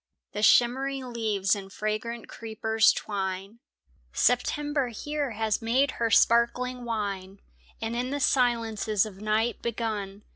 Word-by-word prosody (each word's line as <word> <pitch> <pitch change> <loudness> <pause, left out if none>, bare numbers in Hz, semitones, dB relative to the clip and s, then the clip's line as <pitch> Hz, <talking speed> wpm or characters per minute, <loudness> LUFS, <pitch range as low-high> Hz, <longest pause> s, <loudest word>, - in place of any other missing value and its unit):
The 210 - -4
shimmering 255 +3 +3
leaves 210 -4 +1
and 195 -1 -8
fragrant 215 +3 -3
creepers 220 -1 +1
twine; 195 +1 -4 0.5
September 280 - +1
here 290 +5 -3
has 220 -1 0
made 255 +5 +2
her 230 - +2
sparkling 240 +3 +3
wine 200 -4 -4 0.4
And, 225 +1 -3
in 250 +1 -1
the 285 +1 -2
silences 225 -6 +1
of 200 -2 -10
night 215 +2 0
begun. 210 -4 -3
225 Hz, 120 wpm, -27 LUFS, 210-245 Hz, 0.5 s, shimmering